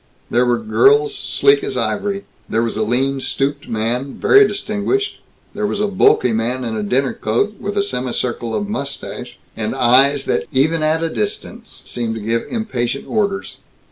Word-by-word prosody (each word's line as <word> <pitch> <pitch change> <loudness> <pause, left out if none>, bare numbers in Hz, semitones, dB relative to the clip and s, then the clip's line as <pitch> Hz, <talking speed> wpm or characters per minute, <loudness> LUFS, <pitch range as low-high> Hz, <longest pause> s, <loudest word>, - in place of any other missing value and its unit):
There 125 +1 +3
were 120 -1 +3
girls 420 - +3
sleek 415 0 +2
as - - -3
ivory. 200 -1 -2 0.2
There 115 - +1
was 115 - -2
a 110 - -1
lean 130 +5 0
stooped 140 +2 -2
man, 120 +5 -2
very 410 0 +5
distinguished. 395 - -2 0.3
There 210 0 -1
was 205 - -3
a 210 - +1
bulky 190 - +3
man 120 +4 -1
in 115 -2 -3
a 110 - -2
dinner 125 +6 0
coat, 195 - -1
with 205 +1 -4
a 200 - +3
semi 130 -10 -2
circle 120 -1 -2
of 205 - -2
mustache, 140 -10 -5 0.2
and - - -3
eyes 135 +3 +4
that 80 - 0
even 155 +5 +2
at 155 +1 +1
a 165 - 0
distance 220 +2 -5
seemed 115 -2 -3
to - - -4
give 115 +2 -1
impatient 140 - -2
orders. 200 -3 -1
140 Hz, 175 wpm, -18 LUFS, -, 0.3 s, very